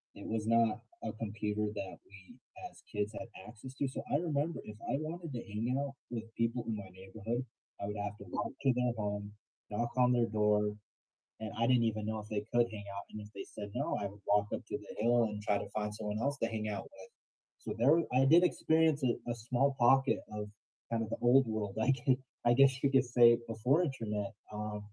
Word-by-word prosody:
it - - -8
was 110 -1 -2
not 115 -1 +3 0.2
a - - -2
computer 105 -1 -2
that 100 -2 -5
we, 95 -1 -15 0.3
as - - -19
kids, 105 +1 -1
had 115 - -6 0.2
access 120 +4 -10
to. 140 - 0
So 130 - -4
I 145 - +4
remember 160 0 -1
if 105 0 -9
I - - +2
wanted 165 +1 -5
to 120 - -3
hang 115 +3 -2
out 140 -1 -3 0.2
with 115 -2 -3
people 115 +1 0
in 115 - -1
my 100 -2 -8
neighborhood, 105 +6 -4 0.4
I - - -2
would 105 0 -4
have 105 0 -3
to 100 - -11
walk - - -2
to 135 -2 +4
their 125 -1 +1
home, 105 -1 -3 0.4
knock 120 +3 -1
on 125 0 +5
their 120 -1 +3
door, 105 -1 +2 0.6
and 110 -1 -5
I 115 +1 +2
didn't 125 -2 +4
even 110 -2 0
know 110 0 -2
if 105 +1 -10
they 105 -1 -1
could 120 0 +5
hang 105 -2 -7
out, 100 - -4
and 105 - -6
if 105 - -9
they - - -5
said 105 -1 -8
no, - - 0
I 100 - -2
would 100 +1 -13
walk 105 0 +4
up - - -2
to - - -2
the - - -10
hill 120 +1 +4
and 105 -1 -4
try 105 -1 +2
to - - -6
find 105 -1 -2
someone 105 0 -3
else 140 +4 0
to 115 - +1
hang 110 -1 -3
out 100 -2 -3
with. 95 -1 -14 0.5
So - - -3
there 120 +3 +2
w 165 - 0
I 130 +1 +5
did 165 +6 +7
experience 160 -3 +3
a 120 -1 0
small 125 +4 +1
pocket 135 +3 +5 0.2
of 105 0 -4 0.4
kind 115 -1 +1
of 110 - -5
the - - -2
old 125 +1 +6
world, 105 -3 -2
like, 125 +5 +3 0.5
I 120 - +6
guess 135 +2 +7
you 140 - +4
could 135 -1 +5
say 120 -1 +10 0.2
before 125 +8 +2
internet, 110 - -2 0.2
um, 105 0 -4
115 Hz, 225 wpm, -33 LUFS, 105-125 Hz, 0.6 s, say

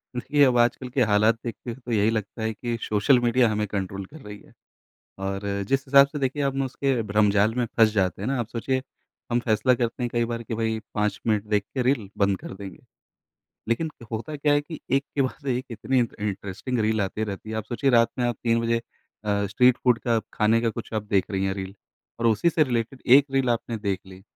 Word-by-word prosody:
देखिए, 145 +4 +2
अब 125 -3 +4
आजकल 120 +2 +1
के 125 +1 0
हालात 105 +1 +3
देख 115 -3 -3
के 120 - -2
तो 125 -1 -9
यही 105 -1 +3
लगता 110 0 -3
है 110 0 -1
कि 120 +2 -3
सोशल 110 +5 +3
मीडिया 120 0 +3
हमें 105 0 0
कंट्रोल 100 -1 -4
कर 155 +11 -13
रही 105 -2 -9
है - - -20 0.7
और 95 0 -2 0.3
जिस 135 0 +1
हिसाब 140 +1 +7
से 145 +2 -6
देखिए 135 +1 -1
हम 135 0 0
उसके 135 -1 -1
भ्रमजाल 105 +1 +3
में 125 0 +1
फँस 115 -2 +6
जाते 95 -2 0
हैं - - -2
ना। 135 -1 0
आप 115 - -4
सोचिए 130 +3 -2 0.5
हम 120 0 +2
फ़ैसला 120 +2 +2
करते 120 +1 -2
हैं 120 - 0
कई 120 0 +1
बार 115 0 -4
कि 115 - -5
भाई 110 0 -1 0.2
5 105 -2 0
मिनट 105 -2 +1
देख 105 -1 +1
के 130 - 0
रील 125 -5 +1
बंद 100 -1 +2
कर - - -9
देंगे। 95 -1 -9 0.9
लेकिन 155 +8 0 0.2
होता 115 +7 -4
क्या 145 +1 +2
है 145 - +4
कि 155 +2 -9
एक 135 +1 +3
के 140 - +2
बाद 130 +2 -4
एक 125 0 0
इतनी 120 +3 0
इंट 120 -2 0
इंटरेस्टिंग 105 +4 -3
रील 110 0 +1
आते 105 +2 -1
रहती 105 +1 -6
है। 110 - -3
आप 110 - -3
सोचिए 120 +5 0
रात 115 -2 +5
में 125 - +1
आप 120 -2 -1
3 115 -1 +2
बजे 115 0 +1 0.5
अ, 100 -1 0
स्ट्रीट 125 +5 +4
फूड 125 -2 +4
का 115 -1 +1 0.2
खाने 110 +1 +3
का 115 - +1
कुछ 115 +1 -8
आप 110 - 0
देख 100 -2 0
रही 95 -1 -1
हैं 95 0 0
रील 95 0 -6 0.5
और 115 - +2
उसी 115 +9 +3
से 160 - +3
रिलेटेड 120 0 -2
1 135 +3 +7
रील 135 -2 +2
आपने 115 0 -1
देख 100 -3 -2
ली 95 0 -13
115 Hz, 230 wpm, -25 LUFS, 105-130 Hz, 0.9 s, हिसाब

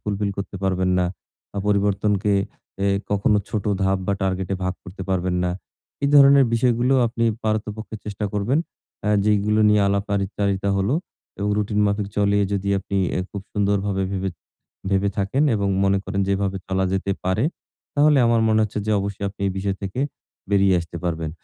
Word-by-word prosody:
Fulfil 105 0 -2
করতে 100 0 -5
পারবেন 95 -1 +1
না। 90 - +2 0.5
আ - - 0
পরিবর্তনকে 100 0 +1 0.5
এ - - +3 0.2
কখনো 105 +1 +2
ছোট 105 -3 -2 0.2
ধাপ 95 0 +2
বা 100 - +1
টার্গেটে 95 0 -1
ভাগ 95 0 -1
করতে 95 +1 -9
পারবেন 90 -1 0
না। 90 - +1 0.5
এ - - +4
ধরনের 140 -1 +8
বিষয়গুলো 120 +2 +2
আপনি 115 0 -1 0.2
পারতপক্ষে 110 0 -2
চেষ্টা 105 0 -4
করবেন 105 +9 +1 0.4
অ্যাঁ 105 0 +2
যেগুলো 105 +1 +2
নিয়ে 105 0 +4
আলাপচারিতা 100 0 -1
হলো 100 +8 +1 0.4
এবং 100 +1 -1
রুটিন 105 0 0
মাফিক 100 0 0
চলিয়ে 100 0 +3
যদি 100 0 -1
আপনি 100 +1 -4 0.2
অ্যা - - 0
খুব 100 - -5
সুন্দরভাবে 100 -1 0
ভেবে 95 0 -2 0.6
ভেবে 100 +1 +2
থাকেন 100 +8 +1
এবং 100 -2 0 0.2
মনে 95 0 +3
করেন 100 +1 -2
যে - - -1
এভাবে 100 -1 -1
চলা 95 0 0
যেতে 95 +1 0
পারে, 95 +7 +1 0.5
তাহলে 150 0 +5
আমার 115 -1 +3
মনে 110 0 +3
হচ্ছে 105 0 -2
যে - - 0
অবশ্যই 100 0 -4
আপনি 100 +1 -14
এই - - -2
বিষয় 95 0 -1
থেকে 95 +6 -3 0.5
বেরিয়ে 100 -2 +4
আসতে 85 0 -8
পারবেন। 80 -2 -2
100 Hz, 170 wpm, -22 LUFS, 95-105 Hz, 0.6 s, ধরনের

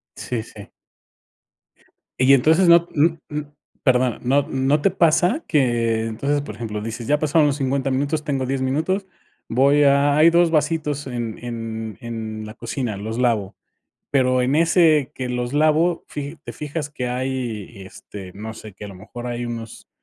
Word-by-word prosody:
Sí, 115 -3 -4
sí. 105 -3 -13 1.5
Y 130 +2 +5
entonces 160 +7 +4
no, 170 0 +6
m 160 +2 +2
m 150 0 -4 0.4
perdona, 125 -3 +2
¿no 135 +3 +2
no 135 +3 +1
te 195 - +3
pasa? 180 - +2
Que 115 -6 +1
entonces, 140 +6 -1
por - - -8
ejemplo, 105 -3 -5
dices: 115 +2 -6
"Ya 150 0 +2
pasaron 155 0 +3
los 145 0 0
50 135 0 -1
minutos, 145 +3 -1
tengo 135 -3 -1
10 135 +1 -2
minutos. 160 +9 0 0.4
Voy 140 +4 +4
a 140 +1 +4
hay 160 +2 +7
2 170 0 +3
vasitos 150 -2 0
en 120 -3 -4
en 115 -2 -5
en 110 -2 -5
la 110 - -8
cocina, 115 -1 -4
los 110 +3 -5
lavo". 115 -6 0 0.6
Pero, 130 -2 +2
en 130 +3 +1
ese 160 -3 +4
que 130 -1 -5
los 125 +1 -3
lavo, 155 +3 +2
fija 145 +2 -6
te - - -7
fijas 150 0 -5
que 125 -4 -4
hay, 125 -5 -4
este, 95 0 -10
no 110 +2 -7
sé, 110 -1 -10
que 100 +2 -11
a - - -7
lo 95 - -10
mejor 120 +6 -9
hay 120 0 -3
unos 115 -1 -7
130 Hz, 170 wpm, -22 LUFS, 115-150 Hz, 1.5 s, hay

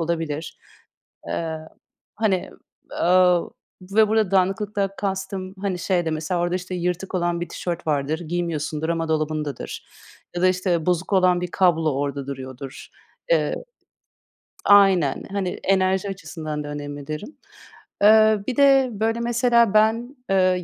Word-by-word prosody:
olabilir. 160 -2 -3 0.7
Eee, 160 -1 -3 0.6
hani, 200 -5 0 0.4
aaa, 180 0 +4 0.5
ve 215 -1 +5
burada 215 -3 +2
dağınıklıktan 195 +1 +1
kastım, 195 -1 -4
hani 195 -3 -2
şey 175 -1 0
de 160 - -1
mesela, 155 +3 -2
orada 175 +1 0
işte 185 0 -4
yırtık 180 +2 -3
olan 175 -1 0
bir 175 - -4
tişört 175 -1 -5
vardır, 150 0 0
giymiyorsundur 160 -2 -3
ama 165 -1 -1
dolabındadır 155 -3 -3 0.5
ya 175 - -1
da 185 - +6
işte 180 -3 0
bozuk 180 +2 0
olan 185 -2 +4
bir 180 - -3
kablo 165 -5 +2
orada 140 0 -3
duruyordur. 130 0 -8 0.4
Eee, - - +2 1.1
aynen, 195 -8 +5
hani 195 -3 -1
enerji 190 0 +1
açısından 155 -6 -5
da - - -7
önemli 145 -1 -6
derim. 155 - -6 0.7
Eee, 215 0 +6
bir 260 - -1
de 275 -2 +5
böyle 225 +3 -1
mesela 235 -2 +3
ben, 225 +5 +2
eee, 185 -2 +2
180 Hz, 135 wpm, -23 LUFS, 160-200 Hz, 1.1 s, da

